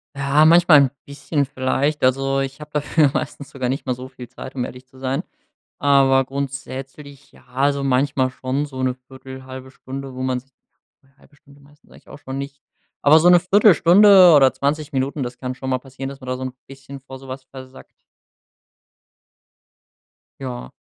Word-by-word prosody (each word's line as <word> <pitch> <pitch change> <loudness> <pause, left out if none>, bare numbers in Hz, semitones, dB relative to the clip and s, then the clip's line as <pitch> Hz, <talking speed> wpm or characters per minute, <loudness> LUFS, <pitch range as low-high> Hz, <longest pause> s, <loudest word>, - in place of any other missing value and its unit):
Ja, 140 +2 +2
manchmal 165 -2 +6
'n 135 - +1
bisschen 140 +1 -2
vielleicht. 135 +3 -2
Also 135 +1 +1
ich 135 +1 -4
hab 150 0 -11
dafür 150 -1 +1
meistens 140 0 -5
sogar 130 -2 -4
nicht 135 +2 -3
mal 130 - -1
so 125 +1 -9
viel 125 -2 -11
Zeit, 130 - -11
um 125 -2 -2
ehrlich 125 +1 -11
zu 130 - -21
sein. 130 +1 -3 0.6
Aber 135 -2 +3
grundsätzlich 140 +1 -7
ja - - -21
also 140 +2 0
manchmal 130 0 +1
schon 130 +3 -3
so 130 -2 -7
'ne 130 -1 0
1/4, 130 0 -11
1/2 130 0 -10
Stunde, 135 0 -9
wo 130 - -6
man 130 -1 -1
sich 135 +2 -31 0.7
1/2 145 - -24
Stunde 140 0 -21
meistens 145 +2 -24
eigentlich - - -19
auch - - -12
schon, 135 -2 -8
nicht. 140 0 -7 0.4
Aber 150 +2 +6
so 175 +3 +5
'ne 175 -1 +6
1/4 200 +3 +5
Stunde 185 -1 +7
oder 135 -2 +5
20 145 +3 -2
Minuten, 135 +1 -2
das 120 0 -6
kann 130 0 -5
schon 130 +1 -6
mal 130 - 0
passieren, 135 +1 -8
dass 140 0 -11
man 130 - -11
da 130 - -2
son 130 0 -5
bisschen 135 0 -12
vor 135 0 -11
so 135 - -14
was 130 +1 -8
versackt. 130 0 -13 2.5
Ja. 125 - -7
135 Hz, 185 wpm, -20 LUFS, 130-145 Hz, 2.5 s, Stunde